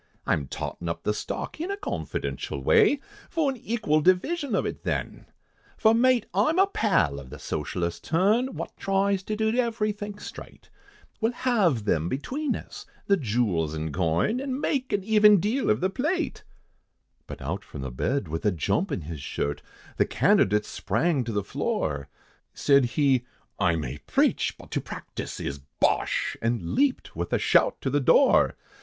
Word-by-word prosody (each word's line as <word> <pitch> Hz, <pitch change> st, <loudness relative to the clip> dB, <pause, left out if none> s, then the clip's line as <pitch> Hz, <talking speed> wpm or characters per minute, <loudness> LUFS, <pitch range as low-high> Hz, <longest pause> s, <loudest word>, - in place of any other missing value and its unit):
I'm 70 Hz, -3 st, 0 dB
tottin' 85 Hz, +5 st, -5 dB
up 85 Hz, 0 st, -4 dB
the 105 Hz, -, +1 dB
stock, 105 Hz, -, -5 dB
in 350 Hz, -, -3 dB
a 400 Hz, -, -2 dB
confidential 405 Hz, -, -4 dB
way, 425 Hz, -, +5 dB, 0.3 s
For 315 Hz, -5 st, +1 dB
an 265 Hz, -, -7 dB
equal 215 Hz, -10 st, 0 dB
division 260 Hz, -, +2 dB
of -, -, +1 dB
it -, -, -4 dB
then, -, -, -3 dB, 0.5 s
For 220 Hz, -, +5 dB
mate, 245 Hz, 0 st, +3 dB
I'm 220 Hz, -, +2 dB
a 385 Hz, -, +6 dB
pal 95 Hz, -, +1 dB
of 65 Hz, -2 st, -12 dB
a 75 Hz, -, -7 dB
Socialistic 85 Hz, +4 st, -4 dB
turn, 215 Hz, +10 st, +2 dB
Wot -, -, -6 dB
tries 195 Hz, 0 st, +1 dB
to 215 Hz, +2 st, -3 dB
do 220 Hz, +1 st, +1 dB
everythink 210 Hz, -4 st, -1 dB
straight, -, -, -11 dB, 0.5 s
We'll 225 Hz, +1 st, +1 dB
halve 195 Hz, -, +1 dB
them 85 Hz, -4 st, +1 dB
between 275 Hz, -, -2 dB
us, -, -, -9 dB, 0.2 s
the 200 Hz, -, +4 dB
jewels 105 Hz, -, 0 dB
and 80 Hz, -1 st, -4 dB
coin, 90 Hz, -, +1 dB
An' 270 Hz, -1 st, -3 dB
make 270 Hz, -3 st, -1 dB
an 200 Hz, -2 st, 0 dB
even 210 Hz, -1 st, +6 dB
deal 225 Hz, +9 st, 0 dB
of 105 Hz, -, +2 dB
the 185 Hz, -, +2 dB
plate." 310 Hz, -, -1 dB, 0.8 s
But -, -, -8 dB
out 95 Hz, +9 st, -4 dB
from 75 Hz, -, -9 dB
the 65 Hz, -1 st, -4 dB
bed, 125 Hz, -, -1 dB
with 80 Hz, +2 st, -4 dB
a 105 Hz, -, +3 dB
jump 100 Hz, -, 0 dB
in 95 Hz, -, -2 dB
his 80 Hz, -1 st, -7 dB
shirt, 70 Hz, +1 st, -3 dB, 0.4 s
The -, -, +4 dB
candidate 105 Hz, +2 st, +3 dB
sprang 130 Hz, -, 0 dB
to 115 Hz, -, -3 dB
the 105 Hz, -2 st, -1 dB
floor, 70 Hz, -6 st, -2 dB, 0.5 s
Said 140 Hz, -2 st, +4 dB
he, 130 Hz, 0 st, +2 dB, 0.4 s
"I 85 Hz, -4 st, +3 dB
may 80 Hz, -, -4 dB
preach, -, -, +1 dB
but -, -, -14 dB
to -, -, -1 dB
practice -, -, -7 dB
is 70 Hz, 0 st, -4 dB, 0.2 s
bosh!" -, -, +1 dB
And 115 Hz, -7 st, -1 dB
leaped 280 Hz, -2 st, +1 dB
with -, -, -3 dB
a -, -, +4 dB
shout -, -, +3 dB
to -, -, -1 dB
the -, -, +2 dB
door. -, -, +5 dB
180 Hz, 175 wpm, -26 LUFS, -, 0.8 s, a